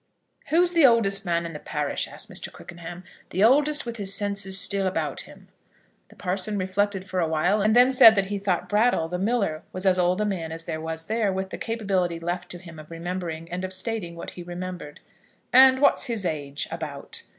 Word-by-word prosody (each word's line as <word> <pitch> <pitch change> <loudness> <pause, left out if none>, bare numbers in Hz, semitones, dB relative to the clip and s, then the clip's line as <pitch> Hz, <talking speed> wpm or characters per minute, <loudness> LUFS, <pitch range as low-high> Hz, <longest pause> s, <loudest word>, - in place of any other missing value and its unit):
"Who's 345 +4 +3
the 335 -3 +3
oldest 200 -6 +4
man 170 0 0
in 165 - -6
the 150 - -7
parish?" 150 -2 -2
asked - - -8
Mr. - - -5
Quickenham; 170 +1 -10 0.3
"the 190 - 0
oldest 290 +5 +3
with 235 0 -5
his 200 -2 -2
senses 195 -1 0
still 195 0 +2
about 185 - -2
him." - - -16 0.6
The - - -18
parson 190 +3 -1
reflected 190 +1 -1
for 185 0 -2
awhile, 170 +5 +1
and 215 +2 +3
then 250 +2 +6
said 225 -4 +8
that 195 -1 +2
he 200 +1 -3
thought 190 -3 -1
Brattle, 210 -5 +2
the 180 +1 -3
miller, 200 -7 0
was 185 +1 -6
as 185 -1 +3
old 180 +2 +2
a 210 - +1
man 175 -6 -3
as 165 0 -5
there 160 -1 -5
was 160 0 -5
there, 220 -1 0
with 190 0 -4
the - - -5
capability 195 -7 -1
left 175 +1 -4
to 175 - -5
him 170 -3 -12
of 155 - -12
remembering 165 -1 -5
and 180 +1 -4
of 185 0 -3
stating 190 -3 -3
what 170 - -7
he 180 - -9
remembered. 175 -3 -7 0.5
"And 260 +1 +8
what's 285 +2 +3
his 230 -6 -3
age, 145 -3 -2
about?" 155 -4 -6
185 Hz, 205 wpm, -25 LUFS, 170-210 Hz, 0.6 s, said